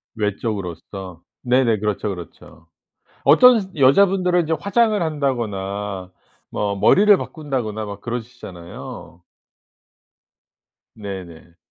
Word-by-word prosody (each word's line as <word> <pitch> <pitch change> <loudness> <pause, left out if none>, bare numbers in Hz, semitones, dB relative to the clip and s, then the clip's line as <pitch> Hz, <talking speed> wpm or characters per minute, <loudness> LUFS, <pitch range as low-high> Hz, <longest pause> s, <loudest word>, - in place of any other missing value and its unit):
외적으로서. 95 -4 -4 0.2
네네. 125 -3 +2
그렇죠 105 0 -2
그렇죠. 90 -5 -10 0.6
어떤 195 - +6
여자분들은 180 +5 +4
이제 160 +1 0
화장을 215 0 +2
한다거나 105 - -3 0.4
뭐 100 -1 -2
머리를 205 - +5
바꾼다거나 125 -9 -4
막 100 0 -8
그러시잖아요. 110 -8 -8 1.7
네네. 90 -6 -9
110 Hz, 240 characters per minute, -21 LUFS, 95-155 Hz, 1.7 s, 어떤